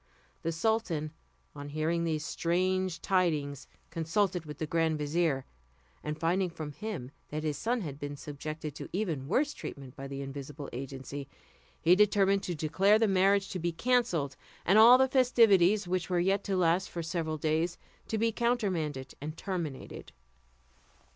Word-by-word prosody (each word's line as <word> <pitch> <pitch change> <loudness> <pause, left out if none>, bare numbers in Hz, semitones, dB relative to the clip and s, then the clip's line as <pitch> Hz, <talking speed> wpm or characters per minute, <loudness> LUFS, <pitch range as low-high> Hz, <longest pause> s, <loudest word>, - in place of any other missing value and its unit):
The 165 - -1
sultan, 165 -5 0 0.4
on 145 0 -7
hearing 160 +3 0
these 155 -2 -1
strange 185 +3 0
tidings, 155 -7 0 0.2
consulted 170 +1 0
with 150 -1 -7
the 155 - -2
grand 160 0 +1
vizier; 150 -2 0 0.6
and 150 +1 -4
finding 180 +3 +1
from 155 -3 -6
him 160 - -6 0.2
that 155 +1 -4
his 150 -2 -1
son 240 +6 -1
had 145 -6 -6
been 145 0 -5
subjected 150 +1 -6
to - - -8
even 165 -9 -2
worse 285 - +1
treatment 135 -2 -8
by 135 - -7
an 135 - -7
invisible 140 +1 -6
agency, 135 +2 -6 0.5
he 175 +2 +5
determined 200 -1 +4
to 175 - -3
declare 190 +7 +3
the 220 0 +3
marriage 195 +1 +3
to 185 - -4
be 170 +1 -1
cancelled, 175 - +1 0.3
and 195 +5 +5
all 235 +3 +10
the 265 0 +4
festivities, 215 -7 +4
which 180 0 -1
were 180 -1 +2
yet 195 +3 +2
to 195 -2 0
last 175 +1 +2
for 170 - -4
several 160 -1 -2
days, 160 +3 0 0.3
to 220 - -1
be 225 +1 +2
countermanded 185 - -1
and 155 +2 -5
terminated. 170 -8 -5
170 Hz, 160 wpm, -30 LUFS, 150-195 Hz, 0.6 s, all